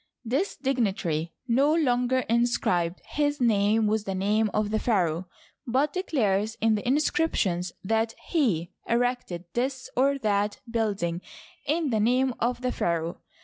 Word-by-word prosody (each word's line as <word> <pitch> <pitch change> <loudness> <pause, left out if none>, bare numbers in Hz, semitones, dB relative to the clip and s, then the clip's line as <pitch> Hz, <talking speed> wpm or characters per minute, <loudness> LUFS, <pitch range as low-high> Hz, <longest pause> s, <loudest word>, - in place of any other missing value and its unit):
This 275 - 0
dignitary 195 - -1 0.2
no 275 +6 +3
longer 255 -4 +2
inscribed 220 -8 +1
his 290 0 -1
name 220 -2 +3
with 210 0 0
the 195 - -2
name 210 +3 +1
of 210 0 0
the 220 - +1
pharaoh, 180 -7 0 0.4
but 270 +5 +1
declares 220 - 0
in 225 0 +3
the 210 +2 -2
inscriptions 260 - +1
that 225 +3 0
he 205 - +1 0.2
erected 235 -7 0
this 260 +2 -2
or 275 +2 +3
that 205 -3 0
building 205 -7 -1 0.5
in 305 -1 +1
the 220 - +1
name 250 +4 +2
of 245 +1 0
the 255 0 0
pharaoh. 170 -3 -2
225 Hz, 140 wpm, -27 LUFS, 200-260 Hz, 0.5 s, no